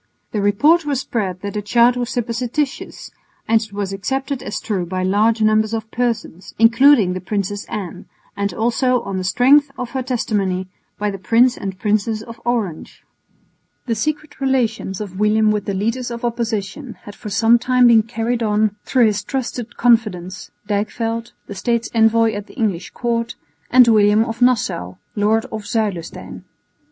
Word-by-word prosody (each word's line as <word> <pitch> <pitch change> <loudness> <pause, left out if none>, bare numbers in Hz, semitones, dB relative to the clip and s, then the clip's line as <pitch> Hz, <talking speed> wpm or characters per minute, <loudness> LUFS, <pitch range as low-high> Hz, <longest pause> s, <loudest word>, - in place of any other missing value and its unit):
The 210 - -1
report 290 +12 +3
was 285 -3 -1
spread 190 -8 -3
that 200 0 -5
the 210 - -2
child 235 +4 +3
was 245 -1 -2
supposititious 245 +4 -3 0.4
and 225 0 +3
it 220 -2 -8
was 200 -1 -4
accepted 270 +6 -3
as - - -4
true 195 -5 -2
by 185 +1 -3
large 215 +4 +2
numbers 215 +1 +2
of 220 0 -6
persons, 230 -7 -3
including 230 -3 +5
the 185 - -5
Princess 205 +1 -3
Anne, 200 -7 -6 0.3
and 200 0 -1
also, 240 +5 +1
on 195 -1 -4
the - - -3
strength 265 +10 +4
of 250 -2 -5
her 265 - -2
testimony, 205 -7 -1 0.3
by 210 0 -1
the 195 - -7
Prince 235 +7 +3
and 190 -1 -6
Princess 215 +1 0
of 230 0 -11
Orange. 220 -9 -3 0.8
The 235 - -1
secret 300 +5 -3
relations 230 -7 -1
of 195 -2 -7
William 215 0 +3
with 210 -1 -2
the 200 - -2
leaders 230 +6 -2
of 235 0 -5
opposition 235 +2 -3
had 205 - -10
for 210 - -9
some 225 +3 +4
time 250 +1 +3
been 230 -2 +7
carried 230 +2 -2
on 210 -1 +1
through 250 -3 +3
his 210 -1 0
trusted 245 -1 -4
confidants, 210 -7 +1 0.2
Dijkveld, 225 +3 -2
the - - -8
State's 235 +3 -1
envoy 225 0 +3
at 205 0 -6
the - - -16
English 205 -8 -2
Court, 230 -1 -2 0.3
and 250 -1 +6
William 215 0 +4
of 225 +1 -6
Nassau, 210 - +1 0.2
lord 215 +2 +1
of 215 -2 -6
Zuilestein. 205 -6 -4
220 Hz, 165 wpm, -19 LUFS, 205-240 Hz, 0.8 s, been